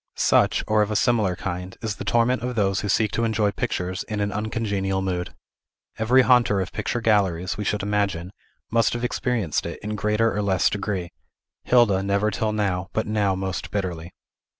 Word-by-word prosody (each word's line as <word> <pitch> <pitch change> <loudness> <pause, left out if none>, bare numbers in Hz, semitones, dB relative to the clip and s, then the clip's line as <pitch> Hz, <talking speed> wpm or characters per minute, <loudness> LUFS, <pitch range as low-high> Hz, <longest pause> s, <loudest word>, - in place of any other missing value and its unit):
Such, - - +3
or 110 0 +2
of 105 - +1
a 105 - -2
similar 110 -5 +2
kind, 90 0 -5
is 105 -3 -3
the - - -5
torment 120 +2 +2
of 125 0 -3
those 100 -2 +1
who 105 - -3
seek 110 +1 +2
to 115 - -1
enjoy 110 -2 +1
pictures 95 -5 -3
in 110 -2 -3
an 100 0 0
uncongenial 105 -3 -2
mood. 90 -2 -3 0.6
Every 125 +4 +5
haunter 120 -5 +4
of 95 -1 -3
picture 120 - -2
galleries, 95 -5 +1
we 105 - -4
should 105 -1 -1
imagine, 100 -4 -1 0.4
must 115 0 +2
have 120 0 -3
experienced 120 - -1
it, - - -6
in 105 0 -3
greater 105 +2 +1
or 105 - 0
less 95 -3 +2
degree; 100 -4 -3 0.5
Hilda 115 -6 +4
never 100 +2 +1
till 110 +2 -1
now, 95 -3 -1
but 110 - 0
now 105 -3 +1
most 95 -1 -4
bitterly. 90 -4 -4
105 Hz, 185 wpm, -24 LUFS, 95-110 Hz, 0.6 s, Every